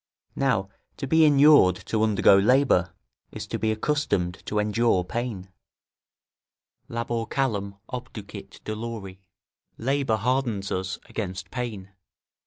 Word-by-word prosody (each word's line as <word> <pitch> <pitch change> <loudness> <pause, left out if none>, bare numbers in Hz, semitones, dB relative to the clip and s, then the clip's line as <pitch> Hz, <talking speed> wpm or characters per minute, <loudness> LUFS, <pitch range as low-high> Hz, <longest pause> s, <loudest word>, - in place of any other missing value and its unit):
Now 115 -9 0 0.3
to 140 - -4
be 160 +3 +4
inured 145 - +6
to 110 - -1
undergo 105 -2 +5
labour, 100 -4 +3 0.4
is - - -6
to - - -4
be 110 0 +1
accustomed 110 - -1
to 105 - -2
endure 105 -2 +2
pain: 105 -2 -5 1.4
"Labor 115 0 -3
callum 100 -7 -1
obducit 110 -5 -8
dolori." 110 -3 -6 0.6
["Labour 135 -1 0
hardens 115 -3 -1
us 95 +2 -2
against 95 -3 -5
pain." 110 -6 -5
110 Hz, 110 wpm, -25 LUFS, 95-125 Hz, 1.4 s, inured